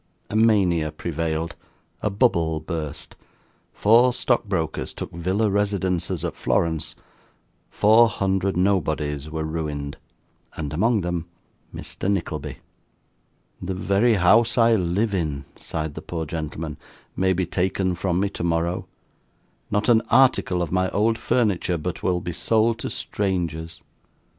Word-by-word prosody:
A - - -3
mania 95 -8 +3
prevailed, 80 +1 -3 0.5
a 105 - +1
bubble 85 -8 +2
burst, 80 -2 -5 0.6
four 120 +4 +5
stock 120 -3 +1
brokers 85 -6 -2
took - - -6
villa 95 +6 0
residences 100 -3 0
at - - -3
Florence, 80 -2 0 0.7
four 110 +3 +5
hundred 95 -2 0
nobodies 75 -6 0
were 80 0 -3
ruined, 75 -3 -4 0.6
and 75 -2 -4
among 110 +6 +2
them 85 -1 -3 0.4
Mr. 95 - -4
Nickleby. 75 -7 -3 1.0
'The 95 +1 -3
very 100 +5 +2
house 110 +6 +4
I 115 -1 +5
live 100 +2 +1
in,' 75 -7 -2
sighed 80 -2 -4
the - - -7
poor 80 -2 -4
gentleman, 80 0 -5 0.4
'may 95 0 +2
be 90 0 0
taken 95 +1 0
from 90 0 -1
me 100 - +2
tomorrow. 85 -1 -1 0.8
Not 105 +1 0
an 115 -2 +5
article 120 -8 +4
of 85 - -5
my 95 0 +1
old 110 +2 +1
furniture, 100 -8 +1
but 85 +2 -4
will 90 -1 0
be 90 0 -4
sold 110 +6 +1
to - - -4
strangers! 85 -5 -3
90 Hz, 130 wpm, -23 LUFS, 80-105 Hz, 1.0 s, four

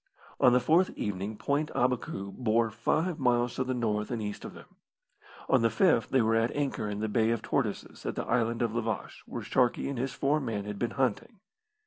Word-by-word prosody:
On 125 - +6
the 125 - +5
fourth 165 +9 +3
evening 105 +1 -3
Point 145 +5 0
Abacou 120 -6 -1
bore 115 -2 +1
five 165 - 0
miles 120 -2 +2
to 130 - -1
the 130 0 -2
north 105 -3 -1
and 120 - -2
east 105 -1 -5
of - - -8
them. - - -12 0.8
On - - +4
the 115 - +4
fifth 115 - +3
they 130 -3 +3
were 110 +1 +2
at 115 +1 +3
anchor 140 -7 -1
in 105 0 -4
the 110 - 0
Bay 110 +1 +2
of 115 -1 -1
Tortoises - - -2
at - - -2
the - - -3
Island 115 0 +1
of 115 -2 -1
La 120 - 0
Vache, 110 -1 -4
where - - -5
Sharkey 125 +1 +1
and 135 -3 -3
his 130 +1 -2
four 145 +2 +2
men 110 -7 -3
had 105 -1 -5
been 120 - 0
hunting. 135 - -1
120 Hz, 220 wpm, -29 LUFS, 110-130 Hz, 0.8 s, On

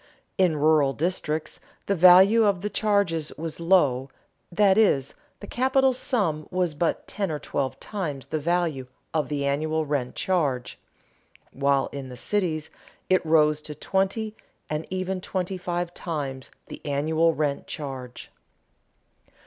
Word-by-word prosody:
In 175 -5 +3
rural 150 -2 +3
districts 155 -1 -2 0.3
the 200 - +1
value 190 +5 +7
of 200 -4 +2
the 210 +1 -3
charges 200 -7 +1
was 165 0 -5
low, 145 -7 +3 0.4
that 195 +2 +4
is, 145 -11 +3 0.3
the - - -7
capital 265 +3 +2
sum 195 - -1
was 180 -3 0
but 165 +3 -1
ten 200 -3 -2
or 155 - -2
twelve 140 -2 -3
times 155 -10 -4
the 155 - -3
value 165 -4 -1 0.3
of 155 -2 0
the 145 -2 -1
annual 155 +3 0
rent 140 -4 -2
charge; 145 -10 -1 0.7
while 140 0 +1
in 135 -2 -7
the 125 - -9
cities 160 - -1 0.4
it 185 - +4
rose 155 -2 +3
to 150 0 -8
twenty 200 +5 -1 0.4
and 155 +1 -3
even 185 0 -3
twenty 185 0 -3
five 175 0 -3
times 140 -7 -5 0.2
the - - -10
annual 160 +3 +1
rent 145 -2 -1
charge. 130 -4 -7
160 Hz, 140 wpm, -25 LUFS, 145-185 Hz, 0.7 s, value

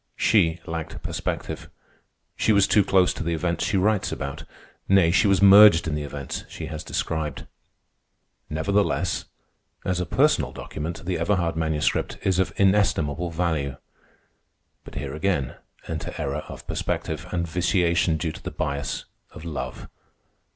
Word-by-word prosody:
She 85 -6 +3
lacked 80 -1 -5
perspective. - - -4 0.7
She - - +2
was 100 -2 +5
too 105 - +4
close 95 -1 +3
to - - -5
the 85 0 -1
events 85 0 -1
she 100 - +1
writes 105 +1 +1
about. 70 +3 -5 0.4
Nay, 95 -4 +5
she 100 +4 +4
was 100 0 +3
merged 100 -4 +8
in 80 - -1
the 75 - -2
events 70 -1 -5
she 80 - -7
has 80 -1 -6
described. 80 -4 -3 1.0
Nevertheless, 100 +7 0 0.6
as 90 -1 0
a 90 - -2
personal - - +2
document, 80 +4 -6
the 90 0 -1
Everhard 85 -5 +1
Manuscript 80 -1 0
is 95 -1 +1
of 95 - +1
inestimable 90 -5 +2
value. 80 -5 -1 1.1
But - - -12
here 70 -1 -4
again 75 -4 -1 0.3
enter - - -5
error 70 +2 -3
of - - -9
perspective, 80 0 -3
and 85 -1 -2
vitiation 85 -1 +1
due 80 0 -2
to - - -11
the - - -5
bias 70 -2 -3 0.2
of 80 - -11
love. 75 -4 -5
85 Hz, 145 wpm, -24 LUFS, 75-95 Hz, 1.1 s, merged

